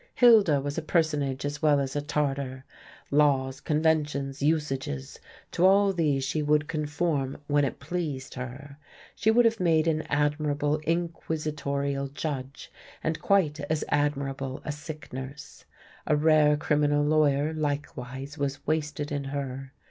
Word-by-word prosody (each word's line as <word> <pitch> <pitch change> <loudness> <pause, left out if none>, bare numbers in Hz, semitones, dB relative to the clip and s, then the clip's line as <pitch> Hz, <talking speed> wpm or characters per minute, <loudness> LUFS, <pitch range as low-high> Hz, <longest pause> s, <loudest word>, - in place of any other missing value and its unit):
Hilda 215 - +6
was 145 +3 -3
a - - -5
personage 150 -4 0
as 145 0 -4
well 150 -2 +4
as 135 0 -3
a 145 - 0
Tartar. 140 -3 -2 0.5
Laws, 135 -2 +2
conventions, 150 -3 0
usages 135 - -1 0.3
to 175 - 0
all 195 +1 +5
these 150 -6 +1
she 145 +4 -1
would 150 0 +2
conform 150 -3 -1
when 145 0 +2
it 140 - -2
pleased 145 -4 -4
her. 135 +3 -8 0.4
She 220 - +1
would 235 +2 +5
have 230 0 +2
made 165 -3 +3
an 160 -1 +1
admirable 145 0 +1
inquisitorial 150 -4 -2
judge, 140 -1 -5 0.3
and 160 0 -2
quite 165 -7 +2
as 155 -1 0
admirable 135 -2 -1
a - - -2
sick 150 0 -9
nurse. 130 +3 -8 0.4
A 150 - +3
rare 150 -1 +4
criminal 145 -1 +2
lawyer, 150 0 +2
likewise, 145 -2 -4
was 140 0 -3
wasted 150 -1 -2
in 145 -1 -2
her. 135 -1 -5
145 Hz, 140 wpm, -27 LUFS, 140-155 Hz, 0.5 s, Hilda